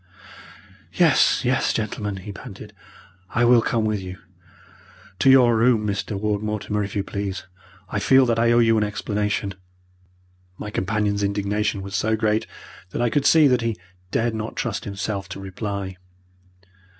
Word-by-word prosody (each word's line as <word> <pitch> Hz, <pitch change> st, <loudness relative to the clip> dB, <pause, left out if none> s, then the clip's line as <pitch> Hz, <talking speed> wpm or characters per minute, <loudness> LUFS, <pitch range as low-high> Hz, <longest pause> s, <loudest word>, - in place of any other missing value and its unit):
"Yes, -, -, +3 dB
yes, -, -, +2 dB
gentlemen," 105 Hz, -2 st, -3 dB
he 95 Hz, +2 st, -8 dB
panted, 100 Hz, -, -10 dB, 0.6 s
"I 120 Hz, 0 st, +4 dB
will 120 Hz, -1 st, +6 dB
come 115 Hz, -1 st, 0 dB
with 105 Hz, -2 st, -1 dB
you. 90 Hz, 0 st, -7 dB, 1.0 s
To 135 Hz, -, +4 dB
your 125 Hz, -3 st, +6 dB
room, 115 Hz, -1 st, +3 dB
Mr. 100 Hz, 0 st, -2 dB
Ward 105 Hz, -1 st, -1 dB
Mortimer, 105 Hz, -1 st, -2 dB
if 100 Hz, +1 st, -6 dB
you 100 Hz, -, 0 dB
please! 100 Hz, -1 st, -4 dB, 0.4 s
I 105 Hz, -, -2 dB
feel 130 Hz, +4 st, +5 dB
that 115 Hz, -2 st, +1 dB
I 115 Hz, 0 st, +3 dB
owe 120 Hz, -, +4 dB
you 115 Hz, -2 st, +4 dB
an -, -, +2 dB
explanation." 105 Hz, -1 st, -2 dB, 1.0 s
My 105 Hz, -, -6 dB
companion's 105 Hz, +1 st, -1 dB
indignation 100 Hz, 0 st, -1 dB
was 100 Hz, 0 st, -6 dB
so 110 Hz, +1 st, +1 dB
great 110 Hz, 0 st, 0 dB, 0.4 s
that 105 Hz, -, -3 dB
I 120 Hz, -, +1 dB
could 145 Hz, +3 st, +2 dB
see 160 Hz, -2 st, +6 dB
that 125 Hz, -1 st, +2 dB
he 115 Hz, -2 st, -2 dB, 0.3 s
dared 115 Hz, +4 st, 0 dB
not 110 Hz, 0 st, -5 dB
trust 110 Hz, -3 st, -3 dB
himself 100 Hz, -1 st, -4 dB
to 95 Hz, -, -7 dB
reply. 95 Hz, -1 st, -5 dB
105 Hz, 160 wpm, -23 LUFS, 100-115 Hz, 1.0 s, will